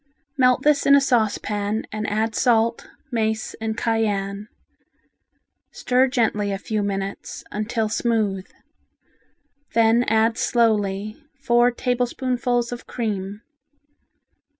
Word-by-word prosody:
Melt 255 0 +3
this 295 -1 +3
in 280 - +8
a - - +7
saucepan 215 -4 0
and 215 0 -3
add 220 +2 0
salt, 230 -1 +1 0.2
mace 220 -2 -1
and 220 0 -2
cayenne. 210 -3 -1 1.2
Stir 255 +1 +2
gently 220 -5 0
a 195 - -2
few 215 +2 -2
minutes, 195 -1 -4
until 215 +1 -1
smooth. 215 -4 -1 1.3
Then 230 +1 +4
add 225 +2 +2
slowly 215 -1 0
four 240 -2 +3
tablespoonfuls 245 0 -1
of 245 - -7
cream. 205 -2 -4
225 Hz, 105 wpm, -22 LUFS, 210-245 Hz, 1.3 s, in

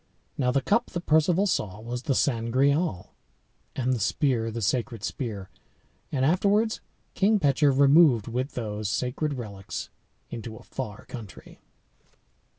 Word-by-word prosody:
Now 125 -3 +1
the 135 +1 +1
cup 230 +4 +2
that 175 -1 -6
Perceval 165 +5 +3
saw 105 - -1
was 120 +2 -5
the 135 -1 0
Sangreal, 130 - +1 0.6
and 130 0 0
the 125 - -1
spear 115 +1 +1
the 115 +1 -4
sacred 115 0 -1
spear; 105 -8 -4 0.6
and 130 -2 +1
afterwards 205 +7 +2 0.3
King 210 +3 +3
Pecheur 145 -2 +3
removed 140 -4 +5
with 125 +4 -3
those 105 -3 -3
sacred 130 +9 -1
relics 100 -6 -6 0.4
into 115 -1 -6
a - - -14
far 105 -1 -7
country. 110 -6 -10
130 Hz, 135 wpm, -26 LUFS, 115-150 Hz, 0.6 s, removed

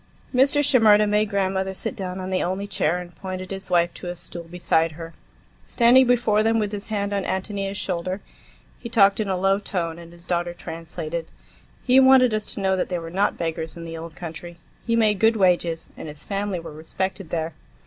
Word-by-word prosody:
Mr. 275 +3 +4
Shimerda 215 -6 +5
made 210 0 +2
grandmother 190 -1 -1
sit 250 - -4
down 185 -3 -5
on 185 0 -5
the 185 - +1
only 190 +3 -2
chair 180 -4 0
and 175 -1 -8
pointed 185 0 -6
his 195 0 -6
wife 170 -1 +2
to - - -9
a 175 - -4
stool 170 0 -8
beside 165 -1 0
her. 165 +1 -9 0.5
Standing 245 +2 +5
before 230 -4 +3
them 225 +1 +2
with 210 -2 0
his 205 -1 -5
hand 205 -2 -2
on 200 -1 0
Ántonia's 195 +1 -3
shoulder, 185 +1 -3 0.6
he 235 - -7
talked 200 -3 +4
in 215 - 0
a 190 -1 0
low 195 +2 +2
tone, 170 -5 -3
and 170 0 -12
his 170 0 -15
daughter 175 -1 -1
translated. 165 0 -6 0.6
He 255 +1 +5
wanted 260 -3 +6
us 215 -1 -1
to - - -4
know 190 -1 +2
that 180 - -1
they 180 - -1
were 165 -1 -7
not 195 +3 +1
beggars 165 0 -4
in 170 - -7
the 165 0 -6
old 165 0 -8
country; 170 0 -8 0.3
he 230 - +2
made 215 -3 +3
good 225 +1 +4
wages, 175 -4 +1
and - - -8
his 150 0 -9
family 200 -2 -2
were 165 -2 -9
respected 190 +4 -4
there. 165 -1 -2
190 Hz, 210 wpm, -23 LUFS, 170-210 Hz, 0.6 s, wanted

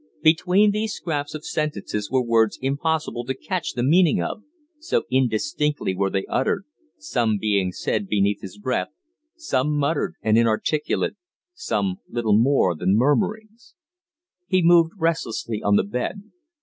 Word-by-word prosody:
Between 180 +6 +4
these 215 +1 -2
scraps 145 -3 -3
of 155 - -8
sentences 150 -9 -3
were 130 0 +1
words 115 -2 +2
impossible 140 -1 -1
to 130 +1 -2
catch 185 -4 -3
the 120 - -2
meaning 160 - +4
of, 85 - -3 0.4
so 315 - 0
indistinctly 130 0 0
were 95 +1 0
they 95 0 -2
uttered, - - 0 0.3
some 110 +2 0
being 100 -3 0
said 200 - -2
beneath 100 - +1
his 95 +1 -9
breath, 125 +5 -1 0.5
some 150 - -1
muttered 145 +2 0
and 110 +1 +4
inarticulate, 115 +7 0 0.4
some 100 - -2
little 115 -3 +1
more 115 -5 +3
than 90 +4 +1
murmurings. 215 - -1 0.7
He 185 -2 +2
moved 170 -1 +5
restlessly 115 - -2
on 100 0 +2
the - - +4
bed. 125 - -3
130 Hz, 140 wpm, -23 LUFS, 110-165 Hz, 0.7 s, moved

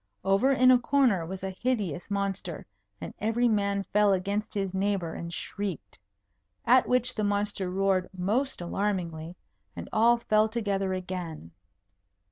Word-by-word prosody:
Over 200 +8 +3
in 255 -1 +5
a 250 - +6
corner 240 -10 +2
was 190 +1 -7
a 190 - -2
hideous 205 - -1
monster, 195 -4 -3 0.3
and - - -7
every 225 +3 +1
man 200 -2 +1
fell 205 -1 +4
against 200 +4 -2
his 195 -2 -2
neighbour 190 -4 -1
and 170 0 -6
shrieked. 200 +3 -5 0.7
At 250 +1 +5
which 250 0 +2
the 215 - -2
monster 205 -2 -1
roared 190 0 +1
most 210 +7 -1
alarmingly, 175 -3 -3 0.4
and 85 0 -7
all 235 +2 +5
fell 215 -1 +2
together 200 -4 -1
again. 180 - -6
200 Hz, 140 wpm, -28 LUFS, 185-220 Hz, 0.7 s, a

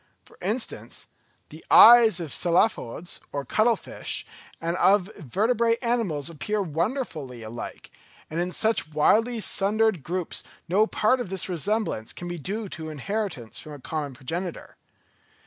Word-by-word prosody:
For - - -18
instance, - - -3 0.4
the 155 +2 -12
eyes 230 -5 +8
of 160 -5 -4
Cephalopods 175 - +1
or 140 -1 -4
cuttle 225 +2 +3
fish - - -5 0.3
and 170 +1 -2
of 195 +1 +3
vertebrate 225 - +1
animals 220 - 0
appear 190 +6 -2
wonderfully 160 - -3
alike; 115 +2 -8 0.4
and 160 - -4
in 175 +1 -1
such 220 -3 +2
widely 225 +10 +3
sundered 210 -2 +2
groups 175 +4 -3 0.3
no 205 +5 +3
part 255 +5 +2
of 240 -7 -4
this 190 -1 +1
resemblance 185 - -2
can 175 - -7
be 175 -1 -5
due 205 +7 -4
to 160 -3 -6
inheritance 155 - -4
from 155 - -9
a 145 - -9
common 145 -1 -4
progenitor. 170 +8 -5
180 Hz, 140 wpm, -25 LUFS, 155-220 Hz, 0.4 s, eyes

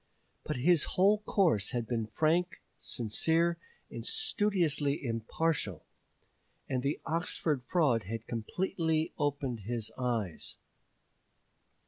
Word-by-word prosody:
But - - -3
his 160 +4 +4
whole 200 +3 +5
course 170 - +2
had 120 -2 -1
been 115 -1 -2
frank, 160 +9 +1 0.2
sincere, 160 +10 +1 0.3
and - - -6
studiously 185 - +1
impartial, 115 - -1 0.8
and 130 -2 -1
the 140 +3 -1
Oxford 160 -3 0
fraud 135 - +2
had 115 +4 -5
completely 160 - -1
opened 140 -5 -1
his 110 +1 -3
eyes. 115 -9 -2
145 Hz, 100 wpm, -31 LUFS, 115-170 Hz, 0.8 s, whole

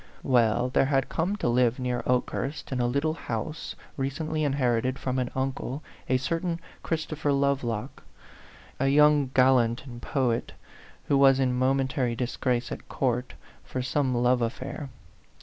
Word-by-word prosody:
Well, 120 -1 +3
there 130 - +3
had 135 -1 +1
come 175 +5 0
to 205 - -2
live 120 0 +3
near 125 -1 -1
Okehurst, 130 +3 -1
in 130 - -1
a 120 - +2
little 140 +5 0
house 150 +1 -5 0.2
recently 155 +3 -2
inherited 130 -3 +1
from 130 -1 -2
an 125 -1 -1
uncle, 135 +1 -3 0.3
a 130 - +4
certain 165 +5 -2 0.2
Christopher 155 -2 -2
Lovelock, 140 -6 -1 0.8
a 135 - +2
young 145 -1 +5
gallant 125 -2 +4
and 120 -3 -9
poet, 125 -4 -1 0.5
who 140 - +2
was 135 -1 +6
in 130 -2 +2
mo 130 +2 +2
mentary 130 -3 0
disgrace 125 0 -1
at - - -7
court 125 -1 -1 0.3
for 130 - -4
some 130 -1 0
love 125 +1 +3
af 115 +1 0
fair. 145 -3 -6
130 Hz, 150 wpm, -27 LUFS, 125-140 Hz, 0.8 s, was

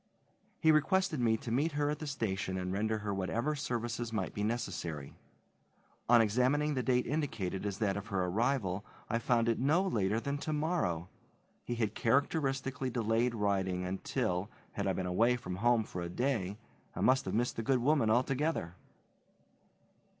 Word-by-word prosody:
He 160 - +5
requested 155 +1 +2
me 115 -2 +3
to 115 - -6
meet 145 +6 +1
her 145 0 +1
at 150 - -4
the 155 - -5
station 95 -8 -2
and 90 0 -2
render 110 +2 0
her 105 -1 -3
whatever 115 +9 -1
services 120 -4 -3
might 105 -5 -2
be 105 - -4
necessary. 90 - -3 1.0
On 120 -1 +7
examining 130 +7 +2
the 130 - 0
date 125 -1 +2
indicated 110 - -2
as 100 -1 -3
that 100 -3 0
of 100 +1 -5
her 95 -4 0
arrival 105 -1 0 0.3
I 115 - +1
found 115 -1 +2
it 115 - +1
no 150 +8 +3
later 110 - +1
than 140 +4 -3
tomorrow. 150 - -1 0.6
He 120 - -3
had 110 -3 -1
characteristically 135 0 0
delayed 115 0 +1
writing 95 -3 0
until, 95 0 -2 0.2
had - - -2
I - - +2
been 95 - -2
away 115 +8 +3
from 105 -7 -5
home 120 +2 +3
for 90 -4 -6
a 85 - -4
day, 105 -2 -1 0.4
I - - -3
must 130 +1 +4
have - - -2
missed 120 +2 0
the - - 0
good 130 +4 +2
woman 125 -2 +2
altogether. 130 - +1
115 Hz, 170 wpm, -32 LUFS, 100-135 Hz, 1.0 s, On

